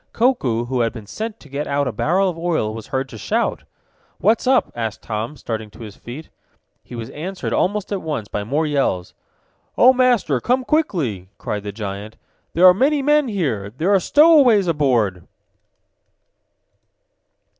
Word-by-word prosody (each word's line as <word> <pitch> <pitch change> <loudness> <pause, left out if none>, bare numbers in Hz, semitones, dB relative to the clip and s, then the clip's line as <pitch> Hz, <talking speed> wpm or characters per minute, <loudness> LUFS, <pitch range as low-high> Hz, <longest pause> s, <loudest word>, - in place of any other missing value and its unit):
Koku, 140 - +1
who 125 +1 -2
had 115 -1 +1
been 115 -4 -9
sent 220 - -6
to - - -15
get 140 +1 -4
out 140 0 0
a - - -1
barrel 180 - +1
of 180 - -2
oil, 165 -10 -1
was 110 -1 -8
heard 130 0 -2
to 110 - -10
shout. - - -1 0.5
"What's 220 +7 +1
up?" 260 -1 +3
asked 110 -2 -4
Tom, 115 +6 -4
starting 110 -3 -5
to 110 - -15
his 105 -3 -9
feet. 135 +7 -10 0.5
He 125 - -10
was 115 +1 -6
answered 180 +5 -5
almost 205 +2 0
at 195 - -2
once 150 -10 -4
by 105 - -4
more 145 +9 0
yells. 135 -12 -1 0.6
"Oh, 255 +2 +7
Master! 245 - +2
Come 255 +2 +1
quickly!" 155 - -1
cried 105 - -4
the 105 0 -6
giant. 100 0 -7 0.4
"There 175 +3 +5
are 180 - +9
many 275 +8 +1
men 295 0 +3
here. 140 - -2
There 160 - 0
are 195 - +5
stowaways 280 - +5
aboard!" 120 - 0
145 Hz, 165 wpm, -20 LUFS, -, 0.6 s, are